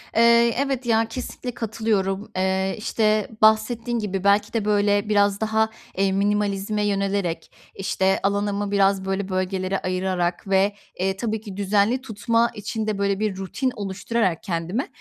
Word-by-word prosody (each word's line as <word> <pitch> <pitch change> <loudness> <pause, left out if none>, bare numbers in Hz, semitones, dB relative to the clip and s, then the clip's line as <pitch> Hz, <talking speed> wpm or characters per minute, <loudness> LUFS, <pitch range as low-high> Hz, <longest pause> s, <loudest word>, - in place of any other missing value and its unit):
Eee, 235 +1 +5
evet, 270 -2 -1
ya, 225 -1 +3
kesinlikle 250 +1 -6
katılıyorum. 215 -3 -1
Eee, 190 0 0
işte, 215 -1 +1
bahsettiğin 225 +2 +3
gibi 195 -2 -3
belki 200 +1 +3
de 225 -3 -1
böyle 205 0 +2
biraz 205 -1 +2
daha, 220 0 +2 0.3
eee, 195 0 +2
minimalizme 205 +1 0
yönelerek, 195 -3 -1 0.2
işte, 190 0 +1
alanımı 200 0 0
biraz 195 -1 +2
böyle 195 0 -2
bölgelere 185 0 -1
ayırarak 185 -1 -1
ve, 195 +1 +2 0.2
eee, 190 +1 0
tabii 220 -1 -2
ki 200 -3 -9
düzenli 205 +5 +2
tutma 230 0 0
için 215 +1 -4
de 210 -2 -1
böyle 200 -1 0
bir 210 -3 -1
rutin 250 +7 -2
oluşturarak 195 -2 -1
kendime 180 - -2
205 Hz, 145 wpm, -23 LUFS, 195-220 Hz, 0.3 s, Eee